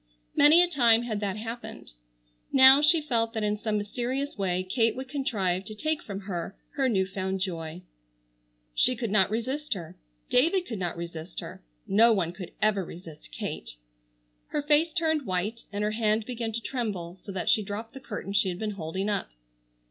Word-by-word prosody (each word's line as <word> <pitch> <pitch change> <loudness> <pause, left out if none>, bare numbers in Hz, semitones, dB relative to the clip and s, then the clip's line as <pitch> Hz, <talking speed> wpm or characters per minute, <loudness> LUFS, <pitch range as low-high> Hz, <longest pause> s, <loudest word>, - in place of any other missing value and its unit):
Many 310 +5 +7
a - - +3
time 240 -8 +4
had 220 -3 -2
that 205 -1 -2
happened. 230 - -7 0.6
Now, 265 +1 +8
she 315 +2 +5
felt 230 -5 0
that 220 -2 -2
in 210 0 0
some 215 -1 0
mysterious 250 +7 -2
way 185 -2 0
Kate 225 +4 +1
would 260 +1 -5
contrive 200 -10 -1
to 215 - -8
take 310 +7 -1
from 200 -1 -6
her 195 -1 -5
her 270 -3 +1
new 190 -5 +2
found 190 0 -3
joy. 170 -2 -4 0.9
She 255 - +3
could 230 -3 -3
not 195 -3 +4
resist 255 +4 -2
her,—David 175 - -1
could 225 - -5
not 175 -2 -3
resist 170 0 -6
her,—no 195 - +1
one 175 -5 0
could 180 0 -8
ever 210 -3 +3
resist 165 - -11
Kate. - - -5 0.7
Her 295 - -2
face 300 +3 +3
turned 315 -4 0
white 195 +5 -2
and 205 0 -2
her 210 - +1
hand 215 0 +1
began 235 -2 -3
to 230 - -2
tremble 200 -9 -3
so 195 - -9
that 185 - -3
she 215 - +5
dropped 210 +3 -6
the 270 - -8
curtain 200 -6 -6
she 205 -1 +3
had 175 - -4
been 215 +2 -2
holding 190 +1 -3
up. 205 - -1
215 Hz, 180 wpm, -28 LUFS, 185-250 Hz, 0.9 s, Now